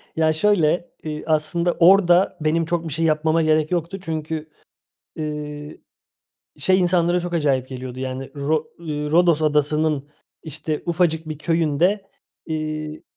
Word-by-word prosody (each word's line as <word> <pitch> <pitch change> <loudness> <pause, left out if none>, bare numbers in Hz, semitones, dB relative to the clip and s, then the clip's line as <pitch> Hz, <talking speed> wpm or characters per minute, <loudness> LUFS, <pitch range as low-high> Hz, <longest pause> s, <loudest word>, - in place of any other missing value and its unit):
Ya 160 -1 +2
şöyle, 175 -1 +2
iii, 150 -1 -5
aslında 160 +3 +1
orada 180 +1 +5
benim 160 +2 +1
çok 170 0 -2
bir 155 - -4
şey 165 +2 0
yapmama 160 +1 +2
gerek 155 0 +2
yoktu 175 +2 -2
çünkü, 160 -2 -4 0.7
ııı, 150 -1 -5 0.9
şey 190 0 +3
insanlara 175 0 +2
çok 175 0 -4
acayip 135 -5 +1
geliyordu 130 -1 -7
yani 130 0 -5
Ro 150 +2 0
ııı, 150 -3 -4
Rodos 170 -1 +4
Adası'nın 150 -1 +1 0.3
işte 155 0 -4
ufacık 165 -2 0
bir 155 -2 -5
köyünde, 170 +5 +1 0.4
iii, 155 -1 -4
155 Hz, 130 wpm, -22 LUFS, 150-170 Hz, 0.9 s, orada